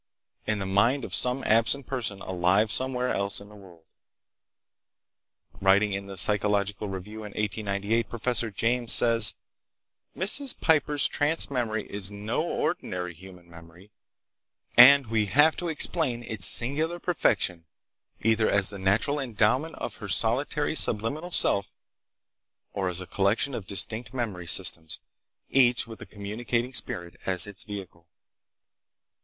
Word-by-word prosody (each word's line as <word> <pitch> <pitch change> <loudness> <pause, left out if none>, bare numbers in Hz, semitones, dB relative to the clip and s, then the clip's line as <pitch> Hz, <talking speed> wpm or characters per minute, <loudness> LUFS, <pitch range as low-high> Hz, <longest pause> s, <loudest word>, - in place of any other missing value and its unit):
In 105 - 0
the 100 - -4
mind 115 +8 +1
of - - -9
some 125 +2 +3
absent 115 +5 +1
person 115 -7 -4
alive 95 +4 0
somewhere 125 0 -1
else 100 0 -2
in 100 - -14
the 105 - -16
world." 90 -5 -17 1.8
Writing 100 +2 +2
in 100 0 -5
the 100 -1 -9
Psychological 100 +2 +1
Review 95 +3 -8
in 105 -2 -9
1898, 105 +1 -2
Professor 120 0 -1
James 115 +3 -1
says: 115 -3 +3 0.8
"Mrs. 250 +9 +4
Piper's 150 -3 +2
trance 150 +1 0
memory 110 -5 -3
is 100 -1 -1
no 105 +1 -3
ordinary 90 -1 -4
human 90 0 -15
memory, 85 +4 -17 0.8
and 135 +3 +8
we 110 -2 -1
have 145 +8 +3
to 175 - -4
explain 150 -6 -1
its 110 -7 +3
singular 155 +8 +5
perfection 95 - -1 0.6
either 110 0 +2
as 100 -1 +1
the 100 - -8
natural 105 +10 0
endowment 125 +4 -1
of - - -7
her 105 - -9
solitary 135 - +2
subliminal 140 +5 0
self, 100 - +1 1.0
or 95 -2 -2
as 90 +1 -5
a - - -8
collection 100 +9 -1
of 105 -6 -7
distinct 110 +5 0
memory 100 -8 -5
systems, 80 0 +1 0.5
each 125 -2 +3
with 115 -1 -12
a - - -10
communicating 115 +4 -4
spirit 85 -7 -3
as 90 -2 +4
its 100 -2 -11
vehicle. 95 -5 -10
110 Hz, 135 wpm, -26 LUFS, 95-125 Hz, 1.8 s, and